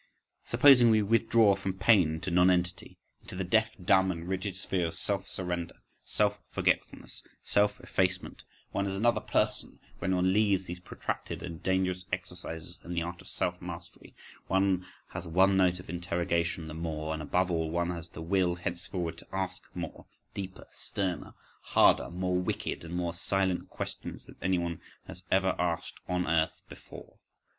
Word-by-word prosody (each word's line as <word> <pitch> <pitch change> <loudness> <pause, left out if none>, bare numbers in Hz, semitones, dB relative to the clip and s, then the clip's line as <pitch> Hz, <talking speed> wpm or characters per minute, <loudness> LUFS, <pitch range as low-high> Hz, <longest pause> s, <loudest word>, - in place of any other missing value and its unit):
Supposing 130 -5 +7
we 110 -1 +5
withdraw 115 0 +4
from 95 -1 -4
pain 95 -6 +5
into 80 +3 -4
nonentity, 90 0 +2 0.2
into - - -10
the 95 - -2
deaf, 110 +5 +2
dumb, 95 +1 +4
and 85 -1 -6
rigid 95 +1 -2
sphere 90 -1 0
of 80 - -6
self 100 +2 0
surrender, 90 -2 -3 0.3
self - - +1
forgetfulness, - - -1 0.2
self 105 0 +2
effacement: 95 0 -1 0.3
one 100 0 0
is 95 - -2
another 120 +4 +2
person - - 0 0.2
when 95 0 +1
one 90 +1 +3
leaves 100 -3 +3
these 90 0 -6
protracted 90 - -5
and 85 -1 -6
dangerous 95 0 0
exercises 90 -1 -6
in 85 - -5
the 85 - +1
art 85 +1 -6
of - - -15
self - - -2
mastery, - - -9 0.3
one 95 -1 +2 0.2
has 85 - -6
one 95 +4 +4
note 90 -1 +3
of 90 - -11
interrogation 85 -1 -1
the 80 - -6
more, 80 -1 -3
and 80 - -4
above 90 +5 +1
all 80 -2 0
one 85 +2 0
has 85 -1 -6
the 80 - -8
will 90 0 +2
henceforward 85 -1 -3
to - - -14
ask 95 -1 -2
more, 85 -3 -6 0.3
deeper, 95 -2 -6
sterner, 95 -5 -3 0.3
harder, - - +4
more 90 +1 0
wicked, 90 - -2
and 85 +1 -6
more 85 -1 -1
silent 95 +1 0
questions, - - -6
than - - -14
anyone 85 -3 0 0.2
has 90 -1 -9
ever 95 -1 +3
asked 85 -2 -1
on 90 0 0
earth 80 0 +1
before. - - -12
90 Hz, 165 wpm, -30 LUFS, 85-95 Hz, 0.3 s, Supposing